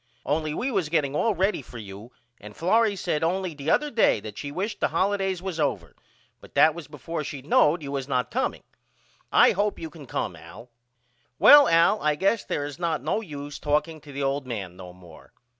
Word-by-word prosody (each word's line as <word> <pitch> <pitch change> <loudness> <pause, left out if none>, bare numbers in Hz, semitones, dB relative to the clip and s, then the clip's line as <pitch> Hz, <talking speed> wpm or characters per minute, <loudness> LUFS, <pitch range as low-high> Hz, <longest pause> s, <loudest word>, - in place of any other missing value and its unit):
Only 155 0 -1
we 265 +2 -2
was 190 -9 -1
getting 150 -3 0
all 220 +5 +1
ready 190 -1 0
for 125 - -12
you 105 +2 -10 0.3
and 105 0 -12
Florrie 215 +4 +2
said 160 -4 -2
only 180 +1 -1
the 145 +1 -5
other 300 - +2
day 225 - +3
that 105 -1 -8
she 145 +4 -6
wished 200 +7 -4
the - - +2
holidays 195 -2 -1
was 185 -4 -4
over 100 - -2 0.4
but - - -17
that 155 - +6
was 170 -2 -9
before 150 +2 -5
she 140 -2 -7
knowed 150 +2 +3
you 140 - -6
was 135 -2 -3
not 125 -3 -1
comeing. - - -2 0.7
I - - +6
hope 205 +2 -1
you 160 -1 -7
can 145 -3 -12
come - - -3
Al. 115 +4 -13 0.7
Well 285 - +8
Al 165 +5 +4
I 150 0 +1
guess 195 +8 +1
there 145 - -3
is 145 +2 -8
not 165 -6 -1
no 170 +8 -1
use 145 -6 -8
talking 150 +2 -1
to 145 - -13
the 140 0 -4
old 135 0 -1
man 100 -7 -5
no 90 -1 -10
more. 90 -3 -16
150 Hz, 210 wpm, -25 LUFS, 135-185 Hz, 0.7 s, Well